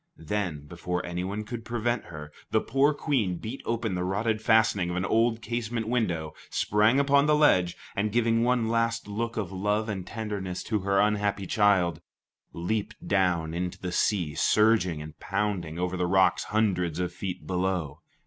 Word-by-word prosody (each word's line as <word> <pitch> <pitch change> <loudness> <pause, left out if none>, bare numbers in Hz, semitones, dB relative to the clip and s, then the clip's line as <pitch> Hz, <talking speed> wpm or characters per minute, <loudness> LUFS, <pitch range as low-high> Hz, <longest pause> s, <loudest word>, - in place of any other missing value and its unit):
Then, 80 -3 -3
before 90 +3 -4
anyone 90 +4 -3
could 115 +1 -6
prevent 120 +1 -1
her, 75 -2 -9 0.2
the - - +3
poor 135 +4 +2
Queen 130 - 0
beat 115 +9 -6
open 115 -3 -1
the 90 0 -1
rotted 105 +4 0
fastening 110 -5 +3
of 90 - -3
an 90 +1 -1
old 115 +1 +1
casement 115 -1 -3
window, 85 -10 -1 0.2
sprang 105 +6 +3
upon 140 +1 +4
the 150 - +5
ledge, 90 - +3 0.2
and 105 +2 0
giving 115 0 +2
one 120 -2 +2
last 115 0 0
look 115 +3 -3
of 100 -4 -2
love 105 +3 -1
and 95 -4 -4
tenderness 100 -5 -4
to 110 -2 -1
her 100 0 +1
unhappy 105 -1 +1
child, 95 -3 +2 0.5
leaped 100 +5 -3
down 90 -5 +1
into 90 +1 -3
the 90 - -4
sea 90 -5 +1
surging 105 -6 +3
and 75 +1 -11
pounding 90 -6 -2
over 90 +1 -1
the 90 -1 0
rocks 95 +1 +3
hundreds 95 -7 0
of 90 -1 -2
feet 90 0 -5
below. 90 -5 -2
100 Hz, 170 wpm, -27 LUFS, 90-115 Hz, 0.5 s, the